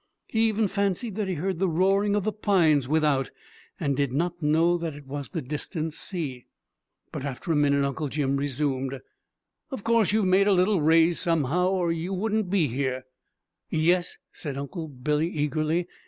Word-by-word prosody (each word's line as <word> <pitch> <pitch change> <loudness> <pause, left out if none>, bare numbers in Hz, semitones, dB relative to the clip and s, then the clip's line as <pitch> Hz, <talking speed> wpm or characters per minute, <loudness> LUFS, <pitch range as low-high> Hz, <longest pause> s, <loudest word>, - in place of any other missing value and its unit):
He 225 0 +2
even 220 -1 +1
fancied 200 +3 -1
that 210 -2 -1
he 185 - -1
heard 180 +2 -2
the 190 -1 +2
roaring 195 +4 +2
of 205 - 0
the 215 - 0
pines 175 - +2
without, 150 -3 +1 0.5
and 140 -1 0
did 140 -1 0
not 170 +5 -2
know 160 +3 +3
that 165 -3 -4
it 145 -1 -12
was 140 +1 -6
the 165 -5 -4
distant 155 +3 -4
sea. 150 -9 -5 0.6
But - - -5
after 140 +4 -4
a - - +2
minute 140 -1 +3
Uncle 140 +2 -2
Jim 140 -1 -1
resumed: 135 -1 -1 0.7
"Of 265 -8 -6
course 230 -4 +3
you've 215 -1 +2
made 190 +2 +4
a 205 - +5
little 185 0 +3
raise 165 +2 +4
somehow, 165 +2 +1
or 180 -3 +1
you 170 +4 -3
wouldn't 215 0 -1
be 185 -4 +2
here?" 130 0 -2 0.7
"Yes," 175 +3 +1
said 140 -4 -6
Uncle 160 +4 -5
Billy 150 +3 -1
eagerly. 155 +2 -1
165 Hz, 175 wpm, -26 LUFS, 145-190 Hz, 0.7 s, a